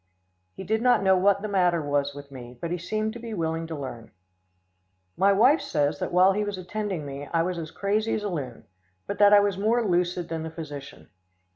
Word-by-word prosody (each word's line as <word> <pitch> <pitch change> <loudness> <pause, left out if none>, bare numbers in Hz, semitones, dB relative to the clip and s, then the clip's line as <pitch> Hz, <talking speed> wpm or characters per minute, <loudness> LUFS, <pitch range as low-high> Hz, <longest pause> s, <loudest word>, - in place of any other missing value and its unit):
He - - -7
did 220 +4 0
not 245 -4 +3
know 190 -1 +5
what 200 +2 +2
the - - -2
matter 180 -4 +2
was 145 -1 -1
with 140 0 -11
me, 125 -2 -10
but 170 - -4
he 175 - -1
seemed 215 +5 -2
to 240 - -8
be 230 -2 -6
willing 165 -1 -2
to 160 - -5
learn. 130 -5 -7 1.1
My 195 +2 +4
wife 250 +11 +4
says 150 - -1
that - - -3
while 185 +2 +5
he 210 +2 0
was 205 -2 -4
attending 185 -3 -4
me 140 +1 -7
I 165 -1 +2
was 180 0 -3
as 160 -1 -6
crazy 210 +5 -1
as 210 - -3
a 205 - -2
loon, 135 -9 -5 0.4
but - - -5
that 205 0 +7
I 205 0 +8
was 200 -2 0
more 225 +3 +2
lucid 180 -2 0
than 165 -1 -4
the 160 - -5
physician. 145 -4 -9
180 Hz, 225 wpm, -26 LUFS, 155-205 Hz, 1.1 s, I